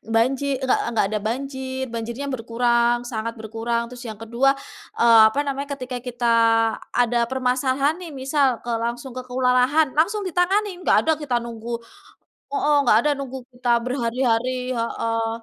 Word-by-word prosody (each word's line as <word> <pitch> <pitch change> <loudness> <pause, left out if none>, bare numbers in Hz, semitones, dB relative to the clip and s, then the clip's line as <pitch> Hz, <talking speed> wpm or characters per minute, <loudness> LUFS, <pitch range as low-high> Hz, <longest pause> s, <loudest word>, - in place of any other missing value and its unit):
Banji 260 +4 +2 0.2
nggak 260 - +2 0.2
nggak 205 - +3
ada 215 - 0
banjir. 265 +3 -3
Banjirnya 235 +4 -4
berkurang, 235 0 +1
sangat 230 -1 -4
berkurang. 230 +2 -3
Terus 245 0 -10
yang 215 - -6
kedua 240 +5 +2 0.4
eee, 230 -1 +7
apa 275 - -2
namanya, 280 +1 -3
ketika 255 -1 -5
kita 240 -1 0 0.6
ada 240 -1 +2
permasalahan 260 +4 +1
nih, 340 - -7
misal 270 -2 +1
ke - - -5
langsung 240 +3 -4
ke - - -3
kelurahan, 255 +4 +2
langsung 410 +7 +2
ditangani. 370 +2 +1
Enggak - - +3
ada 320 - +3
kita 260 -5 -1
nunggu 235 0 -6 0.8
heeh. 300 -7 +2
Nggak 215 - +6
ada 300 - +2
nunggu 265 -1 -5 0.2
kita 240 -1 +1
berhari-hari, 250 0 -1
heeh. 230 0 -1
250 Hz, 150 wpm, -22 LUFS, 235-270 Hz, 0.8 s, eee